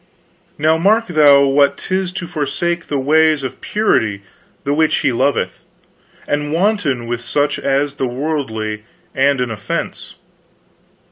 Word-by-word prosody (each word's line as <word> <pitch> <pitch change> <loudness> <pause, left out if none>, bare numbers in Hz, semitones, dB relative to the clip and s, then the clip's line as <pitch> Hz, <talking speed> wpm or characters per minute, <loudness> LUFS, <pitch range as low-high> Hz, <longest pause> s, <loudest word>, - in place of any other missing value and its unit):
Now 160 +2 +2
mark 215 +6 +3
thou 145 -4 +6
what 140 +1 +3
'tis 185 -1 -2
to 185 - -4
forsake 170 +3 -2
the 145 - -1
ways 155 +2 +3
of 130 0 -6
purity 110 - 0 0.4
the 140 - 0
which 155 +1 +2
He - - +2
loveth, 130 +4 -1 0.7
and 145 0 -1
wanton 165 - 0
with 120 0 -3
such 145 +4 -1
as 140 +1 0
be 135 -2 -2
worldly 120 -6 -3 0.3
and 140 0 +2
an 125 -2 -1
offense. 105 -2 -5
145 Hz, 135 wpm, -17 LUFS, 130-160 Hz, 0.7 s, thou